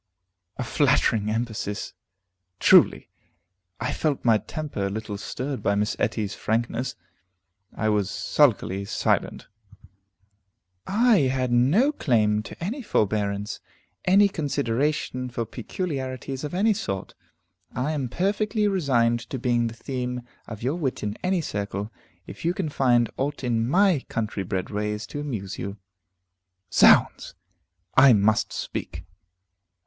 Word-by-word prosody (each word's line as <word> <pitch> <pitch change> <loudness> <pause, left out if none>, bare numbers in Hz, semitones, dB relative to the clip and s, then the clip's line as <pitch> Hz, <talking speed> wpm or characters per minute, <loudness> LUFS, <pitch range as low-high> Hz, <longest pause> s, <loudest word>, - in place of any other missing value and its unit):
A - - -2
flattering 115 -4 +2
emphasis, 110 -2 -3 0.7
truly! - - +5 0.7
I 120 - -2
felt 150 -5 -1
my 115 -2 +5
temper 110 -2 -4
a - - -3
little 105 0 -5
stirred 130 +6 -4
by 100 - +1
Miss 105 +1 0
Etty's 105 -2 -1
frankness. 120 +3 -2 0.8
I 110 - -1
was 105 -2 +1
sulkily 100 -3 +1
silent. 105 - -1 1.4
"I 225 +3 +4
had 130 -2 -1
no 150 - +4
claim 110 - +1
to 105 - -9
any 235 +10 -3
forbearance, 105 - -1 0.4
any 200 +2 +5
consideration 140 - -1
for 120 -1 -3
peculiarities 130 - -5
of 150 +3 -4
any 215 +4 +3
sort. 100 - -4 0.6
I 130 +4 -1
am 140 -5 -2
perfectly 210 - 0
resigned 125 -11 +2
to 130 - -3
being 120 -1 +1
the 115 - -7
theme 125 0 -4 0.2
of 110 -1 -8
your 135 +7 0
wit 140 -7 -2
in 105 0 -2
any 185 -1 +1
circle, 100 -4 -4 0.3
if - - -10
you 170 +2 +1
can 185 -5 -2
find 120 -4 +3
aught 140 +1 -2
in 115 -1 0
my 190 -1 +4
country 110 -3 -2
bred 95 +1 -3
ways 105 +1 -2
to 145 - -6
amuse 105 -11 -5
you." 100 +2 -5 1.0
Zounds! - - +5 0.6
I 130 -1 +8
must 110 +2 +2
speak. 85 - -5
125 Hz, 130 wpm, -25 LUFS, 105-150 Hz, 1.4 s, I